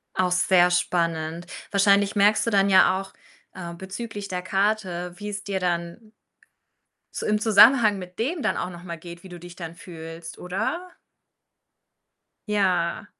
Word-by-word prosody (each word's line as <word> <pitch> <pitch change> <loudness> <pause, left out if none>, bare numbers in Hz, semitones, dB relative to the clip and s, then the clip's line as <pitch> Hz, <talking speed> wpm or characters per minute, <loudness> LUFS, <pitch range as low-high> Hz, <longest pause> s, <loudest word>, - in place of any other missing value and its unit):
Auch 180 -1 +1
sehr 180 0 +4
spannend. 170 -1 -1 0.2
Wahrscheinlich 200 0 +3
merkst 205 +3 +4
du - - +1
dann 200 -2 +3
ja 190 0 +5
auch, 195 - -10 0.4
äh, 175 -2 -7
bezüglich 200 +3 -7
der 180 -1 -3
Karte, 190 -2 -1
wie 205 +2 -7
es 200 0 -5
dir 195 -2 -2
dann 175 +4 -3 1.0
so - - -4
im 210 0 +2
Zusammenhang 215 0 +6
mit 180 -1 -10
dem 305 +9 -1
dann - - 0
auch 180 - -3
noch 175 0 -11
mal 170 -2 -6
geht, 170 +1 -11
wie 190 - -12
du 175 -1 -10
dich 175 +1 -11
dann 170 -2 -8
fühlst, 165 -1 -10
oder? 220 - -3 1.6
Ja. 185 -5 0
185 Hz, 155 wpm, -24 LUFS, 175-205 Hz, 1.6 s, Zusammenhang